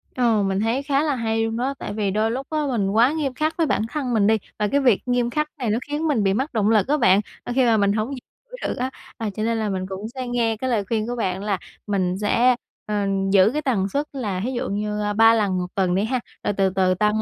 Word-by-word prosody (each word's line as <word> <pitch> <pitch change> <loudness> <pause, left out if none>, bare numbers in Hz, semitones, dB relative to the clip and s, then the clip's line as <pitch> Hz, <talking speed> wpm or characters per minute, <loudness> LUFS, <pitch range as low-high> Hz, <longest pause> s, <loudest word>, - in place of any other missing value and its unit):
Ờ, 230 -5 +2
mình 195 0 0
thấy 230 +6 0
khá 285 0 +1
là 295 -3 0
hay 225 -1 0
luôn 225 0 -2
đó, 265 +3 -1
tại 205 - -5
vì 205 -2 -1
đôi 215 +2 +1
lúc 265 +3 -4
á 310 -1 -1
mình 205 -6 0
quá 230 +6 +4
nghiêm 285 -5 -1
khắc 310 +5 -1
với 325 -2 +2
bản - - +1
thân 270 -6 -2
mình 210 -2 +3
đi, 220 0 +4 0.2
và 210 - +2
cái 280 +6 +2
việc 245 -7 +4
nghiêm 245 -1 +1
khắc 300 +3 -1
này 245 -5 -2
nó 220 +3 +1
khiến 300 +2 -1
mình 245 -9 +1
bị 195 0 +2
mất 265 +6 -2
động 215 -1 +2
lực 215 0 +3
á 300 +2 +2
bạn, 200 -5 +4 0.2
ơ, 245 - -4
khi 260 - +4
mà 225 -2 +4
mình 200 0 +2
hổng 220 +3 -1
giữ - - -14
được - - -2
á, 255 +1 -1 0.3
à, 225 -2 -2
cho 215 - -2
nên 230 0 0
là 215 -2 -1
mình 185 -1 -2
cũng 195 +3 -5
sẽ 255 -1 -4
nghe 230 -2 0
cái 260 +3 -2
lời 215 -4 +1
khuyên 220 -1 -1
của 245 - -3
bạn 190 -3 -2
là 200 -3 0 0.3
mình 185 -2 0
sẽ, 245 +4 +3 0.3
ờ, 210 -1 -1 0.3
giữ 195 +1 +6
cái 300 - -1
tần 210 -9 0
suất 285 +5 -1
là 205 -9 -3
thí 255 - -1
dụ 245 - -3
như, 210 +1 -2
a, 205 0 -1
3 225 +1 +6
lần 200 -4 +1
1 180 0 -2
tuần 185 -2 +1
đi 195 - +1
ha, 250 +3 0 0.2
rồi 205 - 0
từ 195 -1 +3
từ 185 -1 +2
tăng 210 +3 +1
225 Hz, 280 wpm, -23 LUFS, 205-255 Hz, 0.3 s, giữ